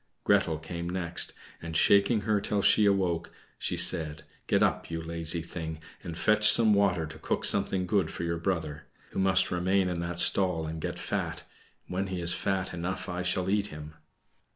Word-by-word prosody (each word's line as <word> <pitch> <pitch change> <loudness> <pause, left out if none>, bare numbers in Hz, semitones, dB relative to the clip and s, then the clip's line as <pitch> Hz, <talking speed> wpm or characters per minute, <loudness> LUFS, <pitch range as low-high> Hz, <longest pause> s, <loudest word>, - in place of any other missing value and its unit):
Gretel 100 -6 +2
came 85 +2 -6
next, 90 -1 -1 0.3
and, 80 -1 -4
shaking 100 +2 +3
her 105 0 0
till 100 -1 -1
she 105 -1 +4
awoke, 95 -4 0 0.3
she - - -2
said, 80 -1 +2 0.2
"Get - - +2
up, - - -1
you 80 0 -4
lazy 80 0 -2
thing, 80 -2 -7 0.2
and 85 -3 -8
fetch 105 +3 +5
some 110 0 +7
water 95 -5 +1
to 80 0 -11
cook - - -2
something 95 -1 +4
good 95 +1 0
for - - -6
your 85 0 -2
brother, 80 -5 -3 0.2
who - - -4
must 95 0 +2
remain 95 +2 +1
in 90 -1 -3
that 85 0 -4
stall 90 -3 +2
and 80 0 -6
get - - -4
fat; - - -4 0.4
when 95 +2 -3
he 95 -1 -4
is 85 0 +3
fat 95 -2 -2
enough 90 +2 -4
I 90 0 -4
shall 90 0 -1
eat 100 +1 0
him." 75 -3 -10
90 Hz, 185 wpm, -28 LUFS, 80-95 Hz, 0.4 s, some